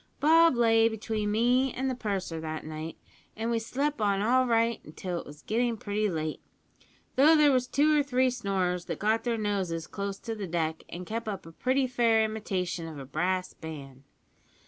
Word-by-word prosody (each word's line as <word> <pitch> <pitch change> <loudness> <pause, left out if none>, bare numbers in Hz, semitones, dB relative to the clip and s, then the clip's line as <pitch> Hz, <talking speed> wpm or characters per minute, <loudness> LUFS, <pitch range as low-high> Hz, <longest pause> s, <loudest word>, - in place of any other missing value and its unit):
Bob 325 0 +6
lay 225 -1 +4
between 220 -1 -3
me 245 +5 +2
an' 265 +1 -1
the 260 - 0
purser 195 -8 -3
that 155 -1 -5
night, 155 +1 -6 0.4
an' 225 +2 -2
we 230 - +1
slep' 275 +4 -2
on 200 -2 +2
all 255 +5 +3
right 230 -8 0
till 180 -2 -3
it - - -10
was 150 0 -12
getting 235 +1 0
pretty 210 +1 -1
late, 155 -3 -3 0.8
though 300 +4 +7
there 300 -2 +6
was 250 -1 +2
two 300 +3 +3
or 295 - +4
three 260 -2 +2
snorers 190 -7 -1
that - - -4
got 220 +2 +1
their 235 -2 0
noses 190 -6 -2
close 200 +2 -4
to 230 +1 -5
the 205 -3 -5
deck 160 -2 -1
an' 180 +1 -7
kep' 225 +4 -4
up 195 -4 -4
a 165 - -10
pretty 260 +9 +1
fair 235 -3 +3
imitation 185 -6 -3
of 160 -2 -8
a 135 - -7
brass 180 +6 -1
band. 140 -5 -9
215 Hz, 190 wpm, -28 LUFS, 180-245 Hz, 0.8 s, though